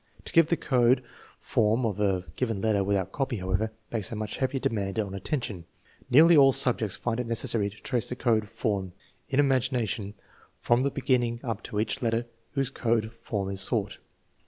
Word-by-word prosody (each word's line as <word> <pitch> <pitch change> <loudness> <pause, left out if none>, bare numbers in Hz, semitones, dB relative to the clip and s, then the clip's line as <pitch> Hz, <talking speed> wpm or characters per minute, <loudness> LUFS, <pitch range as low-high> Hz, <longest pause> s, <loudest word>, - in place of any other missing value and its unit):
To - - -4
give 165 -2 +6
the 170 - +1
code 125 -1 +3 0.4
form 110 +3 +1
of 105 -3 -2
a 95 -3 +1
given 115 -5 -1
letter 105 -1 +1
without 95 -1 0
copy, 135 -2 -2
however, 95 +4 -1 0.2
makes 110 -5 -2
a - - -3
much 105 0 -4
heavier 135 0 -1
demand 100 -5 -2
on 100 -3 -2
attention. 100 - -3 0.4
Nearly 160 +6 +7
all 135 -2 +7
subjects 125 -6 +1
find 120 -1 -2
it 125 - -2
necessary 115 -2 0
to 105 - -15
trace 120 -1 -2
the 125 - -3
code 110 -4 +1
form, 100 -5 -2 0.4
in 135 - +1
imagination, 125 -6 0 0.4
from 120 +1 +2
the 140 - +1
beginning 125 -4 0
up 115 -4 -3
to 105 - -3
each 115 +5 -1
letter 115 0 0 0.3
whose 135 -2 0
code 115 -3 0
form 100 -4 -4
is 95 0 -1
sought. 105 0 +1
115 Hz, 180 wpm, -27 LUFS, 105-130 Hz, 0.4 s, Nearly